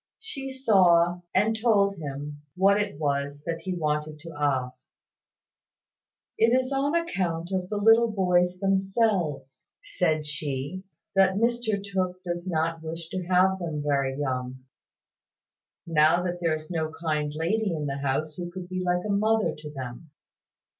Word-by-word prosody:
She 285 Hz, -12 st, -6 dB
saw, 180 Hz, -9 st, +4 dB
and 210 Hz, +4 st, +2 dB
told 205 Hz, -3 st, +2 dB
him, 145 Hz, -1 st, -6 dB
what 200 Hz, +2 st, +4 dB
it 180 Hz, -7 st, -4 dB
was 145 Hz, -1 st, -1 dB
that 165 Hz, 0 st, -2 dB
he 180 Hz, +2 st, -4 dB
wanted 150 Hz, -1 st, -1 dB
to 165 Hz, 0 st, -9 dB
ask. 135 Hz, -4 st, -2 dB, 1.5 s
"It 230 Hz, +3 st, +5 dB
is 255 Hz, +1 st, -3 dB
on 280 Hz, +3 st, +1 dB
account 180 Hz, -, -1 dB
of 185 Hz, -1 st, -2 dB
the 210 Hz, -, -2 dB
little 225 Hz, +3 st, +5 dB
boys 180 Hz, -2 st, +2 dB
themselves," 190 Hz, -, 0 dB, 0.2 s
said 170 Hz, -, 0 dB
she, 150 Hz, +3 st, -4 dB, 0.3 s
"that 190 Hz, -1 st, +4 dB
Mr 230 Hz, -1 st, +1 dB
Tooke 185 Hz, -2 st, -2 dB
does 175 Hz, 0 st, -4 dB
not 165 Hz, -1 st, -1 dB
wish 165 Hz, +1 st, -6 dB
to 185 Hz, 0 st, -3 dB
have 185 Hz, +1 st, +3 dB
them 160 Hz, -4 st, -3 dB
very 140 Hz, -2 st, 0 dB
young, 130 Hz, -2 st, -3 dB, 1.2 s
now 165 Hz, +2 st, +4 dB
that 175 Hz, -1 st, -3 dB
there 165 Hz, -2 st, +2 dB
is 155 Hz, +3 st, -9 dB
no 160 Hz, -2 st, -1 dB
kind 150 Hz, -3 st, -1 dB
lady 200 Hz, +6 st, 0 dB
in 155 Hz, -3 st, -2 dB
the 140 Hz, -1 st, -2 dB
house 140 Hz, +3 st, -1 dB
who 175 Hz, -1 st, -4 dB
could 180 Hz, 0 st, -8 dB
be 185 Hz, 0 st, -3 dB
like 180 Hz, +1 st, 0 dB
a -, -, -3 dB
mother 210 Hz, -4 st, +2 dB
to 150 Hz, 0 st, -9 dB
them." 130 Hz, +2 st, -8 dB
175 Hz, 155 wpm, -26 LUFS, 150-195 Hz, 1.5 s, It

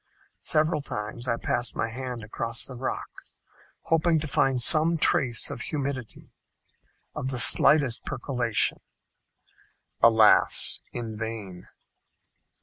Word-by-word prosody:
Several 155 Hz, 0 st, 0 dB
times 120 Hz, -1 st, -7 dB
I 115 Hz, -, 0 dB
passed 120 Hz, +1 st, -3 dB
my 115 Hz, -, -3 dB
hand 125 Hz, -1 st, -7 dB
across 115 Hz, +2 st, -2 dB
the 130 Hz, -, -9 dB
rock 125 Hz, +1 st, -5 dB, 0.8 s
hoping 165 Hz, 0 st, +1 dB
to 155 Hz, -, -6 dB
find 135 Hz, -2 st, 0 dB
some 160 Hz, +6 st, +3 dB
trace 125 Hz, -5 st, +2 dB
of -, -, -8 dB
humidity 140 Hz, -5 st, -6 dB, 0.8 s
of 130 Hz, -, -5 dB
the 130 Hz, -, -3 dB
slightest 140 Hz, -1 st, +5 dB
percolation. 120 Hz, -3 st, -1 dB, 1.2 s
Alas! 110 Hz, -2 st, +4 dB
in 115 Hz, -3 st, -7 dB
vain. 110 Hz, -5 st, -8 dB
125 Hz, 110 wpm, -25 LUFS, 115-140 Hz, 1.2 s, slightest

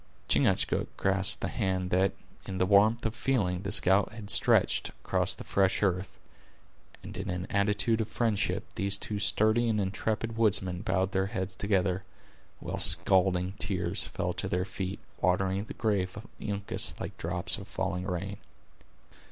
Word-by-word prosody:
Chingachgook -, -, +2 dB
grasped 95 Hz, 0 st, +1 dB
the -, -, -1 dB
hand 95 Hz, -1 st, -1 dB
that, 95 Hz, +1 st, +2 dB, 0.3 s
in 95 Hz, -, -4 dB
the 95 Hz, -, +2 dB
warmth 105 Hz, +5 st, +4 dB
of 110 Hz, -, 0 dB
feeling, 110 Hz, -7 st, 0 dB
the 95 Hz, -, -4 dB
scout 95 Hz, +3 st, +4 dB
had 110 Hz, -2 st, -4 dB
stretched -, -, +4 dB
across -, -, -1 dB
the -, -, -9 dB
fresh 95 Hz, +1 st, +1 dB
earth, 95 Hz, 0 st, -1 dB, 0.9 s
and -, -, -8 dB
in 100 Hz, +1 st, -5 dB
an 90 Hz, 0 st, -3 dB
attitude 105 Hz, +3 st, +2 dB
of 110 Hz, -, -2 dB
friendship 110 Hz, -2 st, 0 dB
these 100 Hz, 0 st, -1 dB
two 105 Hz, +1 st, -4 dB
sturdy 110 Hz, +3 st, +2 dB
and 110 Hz, -1 st, +1 dB
intrepid 110 Hz, +3 st, -2 dB
woodsmen 95 Hz, -5 st, +2 dB
bowed 95 Hz, 0 st, 0 dB
their 95 Hz, -2 st, 0 dB
heads 95 Hz, -1 st, -4 dB
together, 95 Hz, -2 st, 0 dB, 0.6 s
while -, -, -5 dB
scalding 95 Hz, -1 st, +3 dB
tears 95 Hz, -3 st, 0 dB
fell -, -, -3 dB
to -, -, -4 dB
their 90 Hz, +1 st, -1 dB
feet, 95 Hz, 0 st, -5 dB, 0.2 s
watering 95 Hz, +2 st, +1 dB
the -, -, -9 dB
grave 100 Hz, -4 st, -1 dB
of 110 Hz, -, -8 dB, 0.2 s
Uncas 100 Hz, -2 st, -1 dB
like -, -, -5 dB
drops 90 Hz, +2 st, -2 dB
of 100 Hz, -, -10 dB
falling 90 Hz, 0 st, -3 dB
rain. 95 Hz, +2 st, -3 dB
95 Hz, 160 wpm, -29 LUFS, 95-105 Hz, 0.9 s, warmth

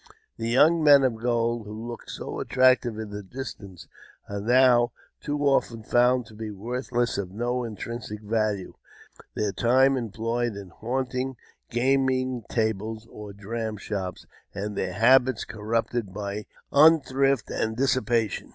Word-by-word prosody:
The 115 Hz, 0 st, -3 dB
young 155 Hz, +7 st, +4 dB
men 145 Hz, -2 st, +7 dB
of 125 Hz, -4 st, +1 dB
gold, 120 Hz, -2 st, 0 dB
who 110 Hz, +2 st, -7 dB
looked 120 Hz, -1 st, -8 dB
so -, -, -5 dB
at -, -, -5 dB
tractive 130 Hz, -3 st, +3 dB
in 110 Hz, -2 st, -6 dB
the 105 Hz, 0 st, -5 dB
distance, 100 Hz, -4 st, -9 dB, 0.4 s
are 100 Hz, 0 st, -4 dB
now 120 Hz, +1 st, +4 dB, 0.3 s
too 145 Hz, 0 st, -3 dB
often 120 Hz, -5 st, +1 dB
found 125 Hz, +2 st, +3 dB
to 110 Hz, -, -15 dB
be 110 Hz, 0 st, -6 dB
worth 120 Hz, +7 st, -5 dB
less 120 Hz, -3 st, 0 dB
and 95 Hz, -3 st, -3 dB
of 95 Hz, -, -15 dB
no 120 Hz, +1 st, -1 dB
intrinsic 115 Hz, -1 st, -6 dB
value; 105 Hz, -3 st, -1 dB, 0.6 s
their 105 Hz, -1 st, 0 dB
time 130 Hz, +6 st, +3 dB
employed 115 Hz, -1 st, -2 dB
in 100 Hz, -2 st, -8 dB
haunting 130 Hz, +5 st, -3 dB, 0.3 s
gaming 130 Hz, 0 st, +1 dB
tables 110 Hz, 0 st, -2 dB
or 105 Hz, -1 st, -9 dB
dram 110 Hz, +2 st, -5 dB
shops, 95 Hz, -3 st, -5 dB, 0.3 s
and 105 Hz, +2 st, -4 dB
their -, -, -2 dB
habits 125 Hz, +1 st, +4 dB
corrupted 110 Hz, 0 st, -2 dB
by 100 Hz, +1 st, -5 dB, 0.2 s
unthrift 140 Hz, -4 st, +4 dB
and 110 Hz, 0 st, -2 dB
dissipation. 120 Hz, -5 st, 0 dB
115 Hz, 145 wpm, -26 LUFS, 105-130 Hz, 0.6 s, men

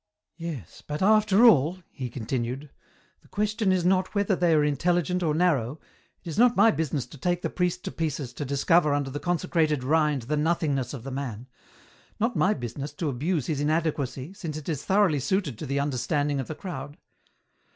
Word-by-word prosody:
" -, -, -61 dB
Yes, 125 Hz, -, -8 dB
but 150 Hz, +4 st, -4 dB
after 215 Hz, +1 st, +5 dB
all," 165 Hz, -, +5 dB
he 130 Hz, -3 st, -5 dB
continued, 125 Hz, +4 st, -4 dB, 0.3 s
" -, -, -36 dB
the -, -, -23 dB
question 210 Hz, 0 st, 0 dB
is 180 Hz, -2 st, +1 dB
not 185 Hz, +2 st, +2 dB
whether 200 Hz, -1 st, +2 dB
they 175 Hz, -2 st, +3 dB
are 150 Hz, -, +4 dB
intelligent 175 Hz, +4 st, +1 dB
or 155 Hz, -3 st, +1 dB
narrow, 155 Hz, -6 st, +1 dB, 0.4 s
it -, -, -12 dB
is 165 Hz, +5 st, -3 dB
not 245 Hz, 0 st, +5 dB
my 225 Hz, +3 st, +6 dB
business 155 Hz, -, -2 dB
to 150 Hz, -, -14 dB
take 175 Hz, +3 st, -1 dB
the -, -, -2 dB
priest 180 Hz, 0 st, -1 dB
to -, -, -3 dB
pieces 145 Hz, -6 st, -3 dB
to 145 Hz, -, -5 dB
discover 145 Hz, +3 st, +3 dB
under 140 Hz, -2 st, -2 dB
the 145 Hz, -, -4 dB
consecrated 165 Hz, -5 st, 0 dB
rind 150 Hz, -2 st, +2 dB
the 145 Hz, +6 st, -1 dB
nothingness 150 Hz, -4 st, 0 dB
of 120 Hz, -, -9 dB
the 135 Hz, -, -6 dB
man; 130 Hz, -4 st, -5 dB, 0.7 s
not 230 Hz, +3 st, 0 dB
my 200 Hz, +3 st, +3 dB
business 135 Hz, +3 st, -5 dB
to 155 Hz, 0 st, -2 dB
abuse 150 Hz, +3 st, -1 dB
his 150 Hz, -3 st, -2 dB
inadequacy 150 Hz, -1 st, -1 dB
since 160 Hz, -6 st, -6 dB
it 155 Hz, -, -9 dB
is 150 Hz, -4 st, -2 dB
thoroughly 190 Hz, -7 st, +3 dB
suited 140 Hz, -, -1 dB
to 155 Hz, -, -5 dB
the 140 Hz, +1 st, 0 dB
under 140 Hz, -2 st, -1 dB
standing 145 Hz, +1 st, 0 dB
of 130 Hz, -, -3 dB
the 155 Hz, -, -5 dB
crowd. 145 Hz, -5 st, -7 dB
155 Hz, 200 wpm, -26 LUFS, 140-180 Hz, 0.7 s, my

